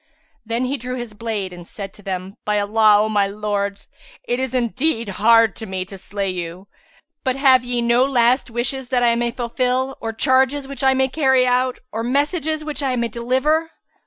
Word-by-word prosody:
Then 230 +3 -1
he 275 +3 -2
drew 250 +1 -5
his 240 -3 -6
blade 210 -4 -4
and 175 -1 -11
said 195 -2 -7
to - - -16
them, 190 0 -5
"By 210 0 +1
Allah, 210 0 +4
O - - 0
my 205 -2 +2
lords, 200 -1 -3 0.4
it 245 +1 0
is 260 -1 -2
indeed 245 -1 0
hard 225 +2 +4
to 220 - -7
me 190 -1 -3
to 195 - -10
slay 195 0 -3
you! 180 +1 -6 0.6
But 260 -3 0
have 265 -2 +5
ye 245 -1 -1
no 235 +2 +4
last 255 -1 +2
wishes 245 +3 -2
that 245 -1 +1
I 235 -1 +4
may 235 0 0
fulfil 250 +2 -1
or 225 - -3
charges 265 +4 +2
which 275 0 -7
I 265 0 +4
may 265 0 +3
carry 265 -2 +3
out, 250 0 +1
or 225 - -3
message 285 +6 0 0.2
which 300 -1 -4
I 265 -2 0
may 235 -1 -1
deliver?" 260 +8 0
240 Hz, 195 wpm, -20 LUFS, 210-260 Hz, 0.6 s, have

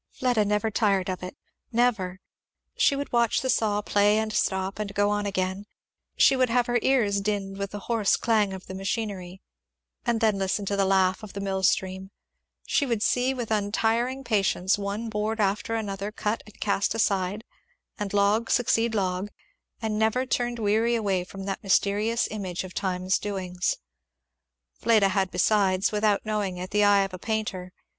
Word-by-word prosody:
Fleda 245 -4 +1
never 210 +2 0
tired 195 -4 +1
of 185 - -5
it 180 0 -7 0.3
never. 220 -6 +1 0.6
She 280 - +3
would 285 +1 -4
watch 235 -2 +2
the 260 - +1
saw 210 -2 +1
play 205 +1 +3
and 220 0 -1
stop, 190 -1 -1
and 200 -2 -4
go 205 0 +2
on 205 0 -1
again; 190 +1 -2 0.5
she 270 - +6
would 255 -1 +2
have 245 +1 +2
her 240 0 +1
ears 210 -7 +2
dinned 195 -1 -3
with 200 0 -2
the 205 0 -7
hoarse 220 -1 +2
clang 215 -4 +2
of 190 -1 -8
the - - -8
machinery, 195 -2 -4 0.6
and 235 -1 0
then 215 -3 +2
listen 195 +1 -1
to 200 - -1
the 200 -1 +2
laugh 190 0 +2
of 215 -2 -10
the 200 - -5
mill 195 -1 -2
stream; 190 0 0 0.6
she - - +1
would 235 -5 0
see 250 +1 +2
with 240 -3 -5
untiring 225 +5 0
patience 200 -4 +1
one 205 +3 -4
board 220 +1 -2
after 210 +2 0
another 200 -2 -3
cut 210 +1 -2
and 210 - -16
cast 200 +1 0
aside, 200 -1 0 0.6
and 205 -2 -3
log 205 +3 +2
succeed 230 -1 +2
to - - 0
log; 185 0 -1 0.5
and 215 -1 -1
never 225 +4 +2
turned 240 -1 -1
weary 225 +2 +2
away 195 -5 0
from 195 +2 -9
that 195 -1 -3
mysterious 205 +4 +1
image 190 -5 -4
of 185 -1 -9
Time's 185 -1 0
doings. 185 -3 -2 1.0
Fleda 215 -4 +3
had 190 0 0
besides, 195 -3 +2
without 210 -1 +1
knowing 205 -4 -2
it, 180 +1 -6
the 210 0 +3
eye 200 -1 +5
of 195 -1 -5
a 185 - -6
painter. 210 -4 -3
205 Hz, 180 wpm, -26 LUFS, 195-225 Hz, 1.0 s, she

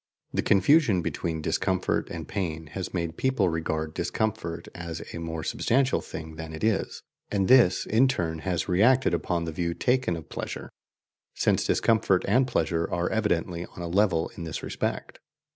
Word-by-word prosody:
The - - +1
confusion 105 - +4
between 80 -1 -3
discomfort 95 +3 0
and 80 -2 -6
pain 80 -5 -3
has 95 -2 -4
made 85 -2 -3
people 130 -8 +2
regard 80 -1 -2
discomfort 85 -6 -2
as 85 -1 -6
a - - -5
more 80 -1 -4
substantial 135 +3 +1
thing 80 -1 -8
than 80 0 -7
it 80 - -7
is, 110 -3 0 0.3
and 100 -2 +1
this 125 -8 +5
in 120 +5 +4
turn 85 -11 -1
has 85 -1 -2
reacted 110 +5 +4
upon 85 0 -1
the 80 - -3
view 85 +1 -2
taken 125 -7 +1
of 80 -2 -8
pleasure, - - -6 0.6
since - - +1
discomfort 110 -5 +2
and 125 +6 +3
pleasure 85 -9 0
are 85 0 -1
evidently 90 -5 -1
on 90 - -9
a - - -3
level 90 -2 +2
in 85 - -9
this 80 -3 -5
respect. - - -3
90 Hz, 165 wpm, -27 LUFS, 80-110 Hz, 0.6 s, this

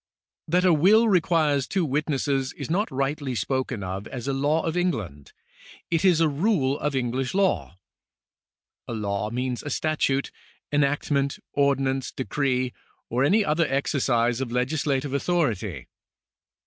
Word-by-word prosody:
That 180 +3 +2
a 180 - +6
will 205 +9 +5
requires 160 -7 +2
two 190 -3 0
witnesses 140 -2 -1
is - - -6
not 205 +6 +1
rightly 135 0 -2
spoken 130 0 -2
of 95 +2 -5
as 125 0 -6
a 140 - 0
law 145 +4 +1
of 165 0 -2
England; 110 - -2 0.6
it 165 +1 +1
is 180 -4 +5
a 165 - +4
rule 145 -3 +1
of 150 -2 -1
English 130 +3 -1
law. 190 - +1 1.1
A - - -4
law 105 -1 -2
means 125 +1 -2
a 145 - -6
statute, 140 -2 0 0.4
enactment, 140 -1 +1 0.2
ordinance, 135 -2 +1
decree, 130 -2 -1 0.4
or 125 +3 +1
any 200 +9 +3
other 160 0 +2
exercise 130 -3 +1
of 130 - -2
legisla 135 +2 0
tive 140 -2 -5
authority. 125 - -1
140 Hz, 140 wpm, -25 LUFS, 125-155 Hz, 1.1 s, a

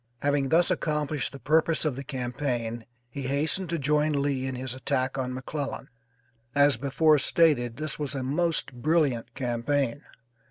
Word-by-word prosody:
Having 145 -1 +1
thus 170 +4 +3
accomplished 150 -4 -1
the 140 - -8
purpose 160 +5 +2
of 150 -5 0
the 135 - -6
campaign, 125 -3 -3 0.2
he 130 +2 -5
hastened 155 +6 0
to 170 - 0
join 150 0 +1
Lee 140 -2 0
in 130 - -3
his 125 -1 -4
attack 130 0 -1
on 130 -1 -2
McClellan. 135 +1 -5 0.7
As 145 0 +5
before 145 +5 +3
stated, 135 -7 +2
this 155 -1 -3
was 145 -2 -2
a 135 - -2
most 160 +3 0
brilliant 135 -2 0
campaign. 130 +2 -1
140 Hz, 155 wpm, -27 LUFS, 130-150 Hz, 0.7 s, As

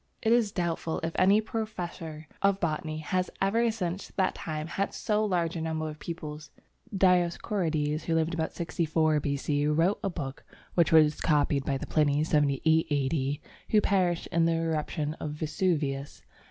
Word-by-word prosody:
It 225 - +2
is 235 -4 +3
doubtful 170 -3 -2
if 165 0 -2
any 195 +3 +4
professor 175 -8 -5
of 200 0 +3
botany 155 -2 -2
has 180 +4 -1
ever 225 +5 +2
since 190 -4 -3
that 190 -2 +2
time 155 -1 -4
had 195 +4 -2
so 215 0 0
large 175 -5 0
a 165 - -3
number 160 -1 -2
of 155 -1 -7
pupils. 155 -3 -7 0.4
Dioscorides, 175 -4 +1
who 165 - +1
lived 165 +1 +1
about 160 -1 -1
64 160 -2 +1
B.C., 145 +1 0
wrote 165 +6 +2
a 195 - +1
book 140 -6 -6 0.3
which 170 -2 +3
was 155 -2 +5
copied 145 -2 +2
by 135 -2 0
the - - -5
Pliny 150 -1 +2
(78 155 +1 +2
A.D.), 140 0 0 0.3
who 215 - +5
perished 185 -5 +1
in 165 0 +3
the 165 - +3
eruption 155 -2 -1
of 150 - -4
Vesuvius. 150 -3 -2
160 Hz, 160 wpm, -28 LUFS, 150-180 Hz, 0.4 s, was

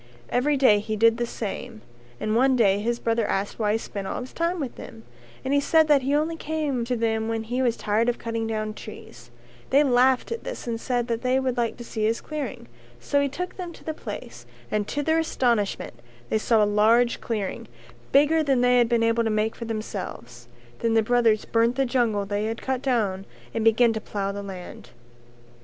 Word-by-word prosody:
Every 280 +4 +1
day 235 -6 +5
he 215 +1 -3
did 225 +1 +4
the 240 -1 -1
same 225 +1 -6 0.4
and 215 0 -1
one 260 +2 +4
day 200 -5 +3
his 235 +3 -1
brothers 230 -2 0
asked 195 +3 -2
why 210 -1 +2
he - - +2
spent 200 -3 -6
all - - -3
his 255 - -8
time 335 +2 -1
with 270 -5 -3
them, 225 - -11 0.4
but 265 - -2
he 285 - +4
said 315 +2 +4
that 290 -2 +5
he 275 +3 0
only 315 +2 0
came 300 -6 -2
to 250 +1 -1
them 220 -1 0
when 225 -1 -2
he 245 +3 -2
was 240 -3 +1
tired 220 +3 +1
of 240 - -1
cutting 230 -1 -3
down 215 -1 -2
trees; - - -11 0.4
they 280 +2 +5
laughed 255 - +3
at 465 - -4
this - - -6
and 230 -1 -3
said 245 -2 -1
that 230 -1 -2
they 255 +1 +2
would 260 -2 -1
like 235 -2 -1
to 240 - -8
see 220 -2 -4
his 225 +2 +1
clearing, 295 - -6 0.3
so 285 - +1
he 280 - +1
took 360 +6 -5
them 360 -2 -5
to - - -15
the 315 - -3
place - - -8 0.2
and 210 -1 0
to 290 - -2
their 320 +2 +2
astonishment 240 -10 0 0.4
they 220 - +1
saw 220 0 +3
a - - +4
large 225 +4 +3
clearing, 210 -5 -3 0.4
bigger 295 +3 +4
than 270 -5 +2
they 250 0 +4
had 235 -1 +3
been 235 -1 +2
able 230 +1 +2
to 225 - 0
make 215 +1 0
for 235 - -6
themselves. 185 - -6 0.3
Then 230 -1 +1
the 225 - +4
brothers 230 -2 +2
burnt 230 +1 +2
the 270 0 +1
jungle 235 -5 +1
they 205 +1 -2
had 225 +1 -3
cut 260 -1 -1
down 210 -8 0 0.3
and 225 - -1
began 225 +1 +4
to 220 - -4
plough 200 -2 -3
the 200 0 -5
land. 190 -3 -9
235 Hz, 220 wpm, -25 LUFS, 215-265 Hz, 0.4 s, day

